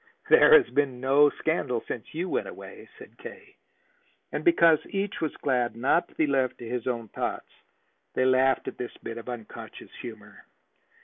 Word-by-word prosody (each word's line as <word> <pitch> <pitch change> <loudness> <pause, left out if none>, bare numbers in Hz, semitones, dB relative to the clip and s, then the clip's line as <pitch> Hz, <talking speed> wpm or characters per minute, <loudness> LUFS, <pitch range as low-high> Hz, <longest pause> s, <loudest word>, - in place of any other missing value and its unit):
"There 460 0 +8
has 390 - -4
been 135 -4 0
no 140 +3 +5
scandal 140 -7 -2
since 120 +5 -7
you 175 +3 -2
went - - -2
away," - - -11
said 440 +1 -15
K. - - -12 0.8
And, - - -3
because 170 - +5
each 200 0 -3
was 160 - -2
glad 125 -4 0
not 130 +8 +1
to - - -24
be 160 - +2
left 135 -3 0
to 120 - -9
his 120 0 -4
own 115 -3 -3
thoughts, - - -4 0.6
they 130 - +2
laughed 130 +1 +3
at - - -6
this 125 - -6
bit 115 0 -6
of 115 - -10
unconscious 120 -3 -9
humor. 105 -3 -11
130 Hz, 175 wpm, -27 LUFS, 120-160 Hz, 0.8 s, There